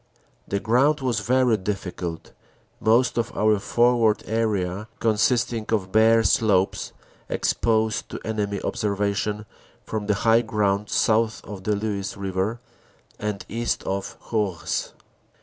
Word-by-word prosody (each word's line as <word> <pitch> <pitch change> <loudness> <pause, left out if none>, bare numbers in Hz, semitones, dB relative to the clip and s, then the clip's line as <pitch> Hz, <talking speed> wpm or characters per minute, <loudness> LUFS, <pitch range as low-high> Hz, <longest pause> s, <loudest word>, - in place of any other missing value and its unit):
The 100 - -1
ground 130 +8 +2
was 125 -5 0
very 125 +1 +2
difficult, 90 -4 -5 0.5
most 115 +2 +3
of 115 - -2
our 105 -1 +3
forward 120 0 +2
area 105 -3 -1
consisting 115 0 +1
of 95 -4 0
bare 115 +1 +5
slopes 100 -2 +2 0.4
exposed 110 -1 0
to - - -6
enemy 105 -2 -2
observation 105 -1 -1 0.4
from 105 -2 -4
the 105 - +2
high 115 +1 +6
ground 105 -3 0
south 110 -1 +1
of 95 -2 -9
the 105 - +2
Luce 100 0 -3
River 100 +3 -2 0.6
and 105 -1 -3
east 115 +2 -2
of 95 0 -4
Hourges. 105 -7 -1
105 Hz, 120 wpm, -24 LUFS, 100-115 Hz, 0.6 s, high